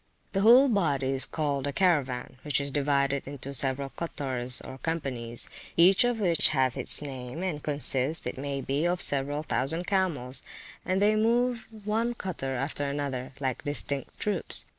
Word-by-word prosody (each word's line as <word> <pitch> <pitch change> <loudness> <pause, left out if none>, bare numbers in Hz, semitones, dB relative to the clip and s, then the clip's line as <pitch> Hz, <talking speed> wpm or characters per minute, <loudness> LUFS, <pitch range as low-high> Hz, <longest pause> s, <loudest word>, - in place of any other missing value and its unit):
[FN#43] - - -41
The 195 - 0
whole 245 +6 +7
body 155 - 0
is 135 0 +2
called 145 -3 -2
a - - -1
Caravan, 140 -8 0
which 145 -3 +1
is 140 0 -3
divided 140 -1 0
into 140 0 -6
several 135 +1 -1
cottors, 130 -7 -1
or 130 - -10
companies, 125 -8 -3 0.3
each 185 +5 +6
of 245 -2 0
which 175 -5 +3
hath 130 -4 +1
its 135 +2 +3
name, 130 +3 -6
and 165 -6 -3
consists, 145 0 +3
it - - -4
may 140 0 -4
be, 140 +3 -1
of 175 0 -1
several 145 +2 +1
thousand 160 +4 +2
camels; 150 -11 +1 0.4
and 190 +2 0
they 210 +1 +4
move 235 +1 +1 0.2
one 225 +3 -1
cottor 145 - -4
after 140 +2 -2
another, 140 -2 -4
like 130 -3 -3
distinct 140 -1 -3
troops. 210 - 0
145 Hz, 165 wpm, -27 LUFS, 135-180 Hz, 0.4 s, whole